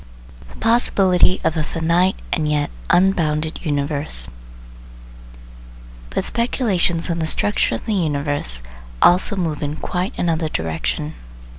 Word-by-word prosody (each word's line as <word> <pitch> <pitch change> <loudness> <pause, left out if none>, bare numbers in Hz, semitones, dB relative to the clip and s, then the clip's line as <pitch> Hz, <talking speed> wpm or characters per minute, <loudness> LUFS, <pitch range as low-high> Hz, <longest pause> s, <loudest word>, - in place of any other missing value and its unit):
THE - - -14
POSSIBILITY 195 -6 +3
OF 160 - +1
A - - +2
"FINITE" 170 +4 +1 0.2
AND 155 -3 0
YET 150 -1 0 0.2
"UNBOUNDED" 160 -4 +2
UNIVERSE 145 - -2 1.8
But - - -1
speculations 205 -8 +1
on 170 - -2
the 160 - -1
structure 205 +5 +1
of - - -7
the 220 - -1
universe 145 - 0 0.4
also 180 - +4
move 165 -6 -2
in 145 0 -2
quite 180 +4 -3
another 165 -2 0
direction. 80 - -2
160 Hz, 120 wpm, -20 LUFS, 145-185 Hz, 1.8 s, also